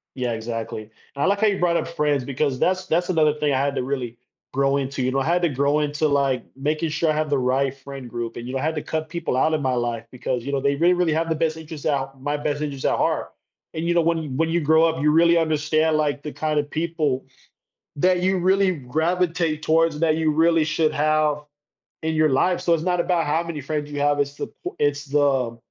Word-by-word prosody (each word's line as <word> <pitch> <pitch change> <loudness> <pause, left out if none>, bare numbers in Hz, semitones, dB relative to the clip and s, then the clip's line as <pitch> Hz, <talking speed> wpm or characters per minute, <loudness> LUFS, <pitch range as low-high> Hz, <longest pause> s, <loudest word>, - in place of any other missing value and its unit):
Yeah, 125 -3 -2
exactly, 115 -1 -4
and 110 - -17 0.3
I - - +3
like 200 +1 +1
how 220 - +4
you 200 -2 +1
brought 175 -1 +2
up - - -1
friends 150 -5 0
because 135 0 -1
that's 185 +4 +1
that's 175 +1 0
another 155 -4 +3
thing 150 -1 0
I 130 - +2
had 140 +1 0
to - - 0
really 125 -3 -3 0.4
grow 135 +1 +2
into, 135 -1 -3
you 125 - +1
know, 135 - 0
I 135 - -2
had 175 +2 +2
to 170 - +3
grow 140 +2 +1
into, 150 +1 0
like, 140 -3 +1
making 150 +4 -1
sure 160 +1 0
I - - +3
have 155 0 -1
the 145 - +1
right 130 +1 0
friend 135 -2 -9
group, 120 -1 -5
and, 120 - -6
you 130 - -5
know, - - 0
I - - -4
had 160 +1 0
to 150 - -2
cut 160 0 -4
people 170 -6 -2
out 155 +5 +2
in 155 - +1
my 130 -2 0
life 120 -1 -2
because, 125 -1 -3
you 140 - -4
know, 140 - 0
they 140 +1 +1
really, 170 +5 +3
really 175 -2 +1
have 165 +2 0
the 160 - +1
best 160 0 -1
interests 160 -2 -9
out 135 -2 -1
my 145 +1 -1
best 145 0 -2
interests 140 -3 -3
at - - +2
heart, - - -1 0.4
and, 160 - -3
you 175 - +1
know, 170 - +4
when 160 -5 -1
when 165 +3 +1
you 170 +1 +1
grow 160 +1 +4
up, 160 -2 0
you 150 - +4
really 170 +2 +5
understand, 155 0 +2
like, 145 -2 0
the 150 - -6
kind 155 -1 -1
of 145 0 -2
people 155 -5 -1 0.7
that 180 +4 +2
you 190 0 +2
really 190 +1 +3
gravitate 160 +3 -1
towards, 160 -1 +2
that 160 -2 +2
you 160 -1 +1
really 165 +1 +3
should 155 0 +1
have 155 0 +2 0.7
in 160 0 0
your 155 -1 +3
life. 175 +7 +2
So 170 - +2
it's 160 -1 0
not 180 0 0
about 170 -2 +1
how 155 +3 +1
many 165 -3 -5
friends 145 +2 -3
you 145 -1 -4
have, 145 0 +2
it's 140 0 -1
the - - -4 0.2
po 360 - -5
it's 145 0 0
the 135 -5 +1
150 Hz, 250 wpm, -23 LUFS, 140-165 Hz, 0.7 s, really